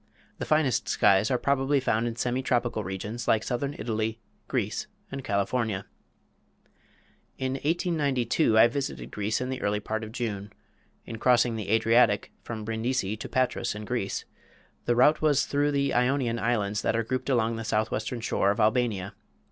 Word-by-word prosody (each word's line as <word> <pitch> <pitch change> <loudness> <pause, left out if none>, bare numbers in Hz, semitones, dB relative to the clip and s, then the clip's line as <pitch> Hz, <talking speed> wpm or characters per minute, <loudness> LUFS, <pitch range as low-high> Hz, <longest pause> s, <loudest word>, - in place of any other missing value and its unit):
The - - -4
finest 150 -6 +2
skies 100 +2 +4
are 125 - +2
probably 140 +1 +1
found 115 -2 0
in 115 - -3
semi 125 +2 -1
tropical 120 -4 0
regions 100 +5 -5
like 110 -1 +3
southern 140 +3 -2
Italy, 110 0 -2 0.3
Greece, - - -2 0.2
and 135 0 -5
California. 100 0 -1 1.5
In 130 0 -2
1892 145 - +1
I 115 - +8
visited 120 - -4
Greece 105 +1 -1
in 125 - -2
the 130 0 -4
early 105 0 0
part 110 +1 -3
of 110 - -7
June. 105 -4 -4 0.5
In 115 -1 -7
crossing 120 -1 +3
the 110 -3 -5
Adriatic, 110 -1 +3
from 110 -2 -6
Brindisi 110 -2 -1
to 110 - -8
Patras 130 -4 0
in 105 0 -6
Greece, 110 -4 -2 0.6
the 120 - +2
route 150 +5 +4
was 150 -1 +3
through 145 -2 +1
the 140 -1 0
Ionian 125 -2 +1
Islands 105 -3 0
that - - 0
are 115 - +1
grouped 130 +4 -3
along 115 -3 +1
the 115 - -4
southwestern 110 +2 -1
shore 100 -3 +1
of 105 - 0
Albania. 110 -3 +1
115 Hz, 165 wpm, -27 LUFS, 110-130 Hz, 1.5 s, I